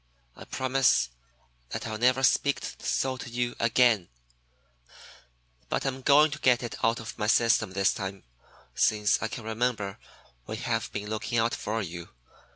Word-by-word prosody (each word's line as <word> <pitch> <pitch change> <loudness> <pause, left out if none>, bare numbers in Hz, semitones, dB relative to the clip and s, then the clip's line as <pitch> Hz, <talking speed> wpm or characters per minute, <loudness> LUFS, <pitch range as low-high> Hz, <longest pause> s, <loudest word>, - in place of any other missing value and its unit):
I - - -11
promise 130 - +2 0.6
that - - -5
I'll 110 -1 -4
never 130 +2 +3
speak 140 +1 +3 0.2
so 130 -1 -1
to 125 - -8
you 120 0 -2
again, 115 -5 +3 1.6
but - - -1
I'm 135 -1 -2
going 150 +3 +5
to 150 - -5
get 125 -3 +3
it 120 - -5
out 115 +1 +2
of 115 0 -8
my 105 - 0
system 115 -4 +3
this 100 0 +2
time. 95 -2 -6 0.5
Since 105 -2 +2
I - - -1
can 110 +2 -7
remember 110 -3 -2 0.5
we 110 - -4
have 115 -1 -2
been 105 0 -5
looking 110 +2 -2
out 115 +1 +2
for 110 +1 -2
you. 85 -1 -7
115 Hz, 160 wpm, -28 LUFS, 105-125 Hz, 1.6 s, going